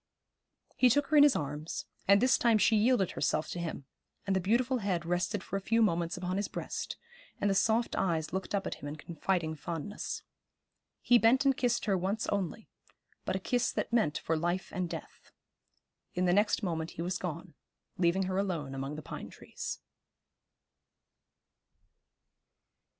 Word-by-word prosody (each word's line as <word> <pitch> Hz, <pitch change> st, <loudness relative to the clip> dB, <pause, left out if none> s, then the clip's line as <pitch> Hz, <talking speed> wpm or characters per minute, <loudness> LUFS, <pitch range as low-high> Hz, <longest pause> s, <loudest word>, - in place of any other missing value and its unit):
He 255 Hz, -, +6 dB
took 290 Hz, +4 st, +3 dB
her 305 Hz, -, +4 dB
in -, -, +9 dB
his 290 Hz, -3 st, +7 dB
arms, 150 Hz, +2 st, -4 dB, 0.2 s
and 200 Hz, +1 st, +7 dB
this 255 Hz, +2 st, +4 dB
time 230 Hz, -2 st, +4 dB
she 215 Hz, +2 st, +4 dB
yielded 215 Hz, -3 st, +3 dB
herself 155 Hz, +1 st, 0 dB
to 175 Hz, -, -4 dB
him, 165 Hz, -5 st, -4 dB, 0.4 s
and 195 Hz, -1 st, +1 dB
the -, -, +3 dB
beautiful 240 Hz, +6 st, +2 dB
head 185 Hz, -5 st, -1 dB
rested 180 Hz, +3 st, -1 dB
for 195 Hz, -, -3 dB
a -, -, -5 dB
few 225 Hz, +4 st, +1 dB
moments 170 Hz, -6 st, +1 dB
upon 180 Hz, +1 st, -2 dB
his 205 Hz, -, -1 dB
breast, -, -, -5 dB, 0.4 s
and -, -, +1 dB
the 200 Hz, -, +3 dB
soft 225 Hz, +4 st, +2 dB
eyes 160 Hz, -4 st, 0 dB
looked 190 Hz, +2 st, -2 dB
up 195 Hz, -, -1 dB
at -, -, -2 dB
him 145 Hz, -, -8 dB
in 145 Hz, -, -5 dB
confiding 165 Hz, +1 st, -2 dB
fondness. 165 Hz, +5 st, -5 dB, 0.8 s
He 245 Hz, -1 st, +6 dB
bent 245 Hz, +5 st, +4 dB
and 270 Hz, -1 st, +4 dB
kissed 245 Hz, -2 st, 0 dB
her 200 Hz, -3 st, +2 dB
once 195 Hz, +5 st, -1 dB
only, 200 Hz, +2 st, -2 dB, 0.6 s
but -, -, -1 dB
a -, -, 0 dB
kiss 245 Hz, -2 st, 0 dB
that -, -, -3 dB
meant 215 Hz, -11 st, +2 dB
for 165 Hz, -, -1 dB
life 175 Hz, +3 st, -1 dB
and 180 Hz, -2 st, -2 dB
death. -, -, -9 dB, 0.9 s
In 180 Hz, +1 st, +1 dB
the 175 Hz, -, +3 dB
next 210 Hz, +3 st, +2 dB
moment 165 Hz, -3 st, -2 dB
he 165 Hz, -, -2 dB
was 180 Hz, +1 st, -2 dB
gone, 175 Hz, 0 st, -5 dB, 0.5 s
leaving 180 Hz, +2 st, +3 dB
her 185 Hz, +1 st, -1 dB
alone 165 Hz, -9 st, -2 dB
among 135 Hz, +2 st, -4 dB
the 155 Hz, -, -7 dB
pine -, -, -7 dB
trees. -, -, -7 dB
190 Hz, 175 wpm, -31 LUFS, 170-220 Hz, 0.9 s, in